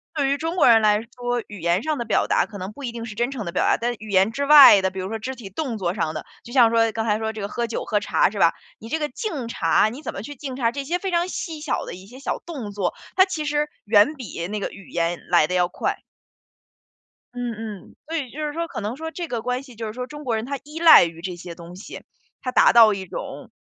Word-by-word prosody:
对 285 -3 +1
于 280 - +2
中 325 +3 -3
国 355 - +4
人 230 -2 +7
来 210 -1 +4
说， 245 +1 -4
语 210 - -10
言 170 +4 +1
上 310 -3 -1
的 235 - -3
表 220 - +1
达 - - +2
可 210 - -9
能 190 +1 -6
不 285 - -11
一 245 - -3
定 230 -1 -6
是 220 - -7
真 240 +4 -1
诚 255 -7 -5
的 170 - -4
表 - - 0
达， - - +3
但 240 +1 -1
语 215 - -10
言 195 +2 +3
之 280 +5 -2
外 280 -9 +10
的， 190 - +1
比 190 0 -7
如 185 - -3
说 225 +1 -4
肢 260 +4 -5
体 230 -5 -10
动 245 +1 -3
作 180 -3 -1
上 160 -6 -2
的， 155 - -5 0.2
就 240 - -12
像 240 -3 +5
说 225 -1 +3
刚 225 0 -3
才 210 -1 +1
说 220 0 -2
这 220 - -9
个 200 - -3
喝 235 +3 -3
酒、 230 - -4
喝 210 -2 +1
茶 205 - +2
是 205 - -6
吧， 170 -2 +5 0.3
你 225 - -10
这 320 - 0
个 300 -1 -1
敬 290 - -4
茶， 205 -1 +2
你 250 +6 -9
怎 - - -5
么 195 - -7
去 290 - -7
敬 265 -1 -6
茶， 235 -3 +1
这 280 +2 -4
些 335 +6 -1
非 380 +1 -4
常 345 0 +1
细 325 -4 -5
小 300 -3 -2
的 - - -7
一 185 +2 -11
些 245 +5 -13
小 275 - -3
动 275 -12 -6
作， 195 -3 -2 0.2
它 375 +1 +6
其 330 -6 -4
实 295 0 0 0.2
远 210 +7 +4
比 200 - -6
那 210 +2 -3
个 - - -3
语 200 - -13
言 170 0 -1
来 175 -3 +5
的 180 - -4
要 180 -1 +3
快。 - - -3 1.3
嗯， 245 -1 -3
嗯。 215 -3 -8
所 330 - -1
以 275 -5 -4
就 305 +2 -4
是 295 - -3
说 335 +2 -3
可 330 - -6
能 210 +4 -3
说 320 +1 -5
这 345 0 -5
个 235 -5 -3
关 250 +3 -2
系 255 -3 -14
就 225 0 -5
是 215 - -6
说， 250 +2 -5
中 295 +2 -9
国 240 -5 -1
人 220 +1 -3
他 280 +2 -3
依 300 +3 -8
赖 330 -1 +9
于 165 0 -8
这 180 0 -5
些 175 0 -9
东 170 +1 -11
西， 190 - -10 0.4
他 255 - -3
达 - - +5
到 225 -3 +8
一 195 -1 -5
种， - - -8
230 Hz, 310 characters per minute, -23 LUFS, 205-280 Hz, 1.3 s, 外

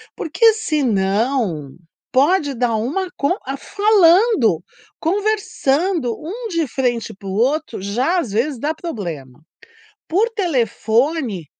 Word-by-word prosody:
Porque 445 +8 +3
senão 220 - 0 0.4
pode 290 +2 +2
dar 235 -1 0
uma 290 - -2
con 285 +6 +1
a 270 +1 -3
falando, 380 - +3 0.4
conversando 350 - 0
um 450 +9 -5
de 335 -5 -1
frente 245 -2 -2
pro 195 -1 -9
outro, 245 +5 0
já 250 - 0
às 255 - -4
vezes 245 +5 -1
dá 300 +5 -1
problema. 165 - -7 0.7
Por 405 +8 +2
telefone, 250 - 0
275 Hz, 110 wpm, -19 LUFS, 220-350 Hz, 0.7 s, Porque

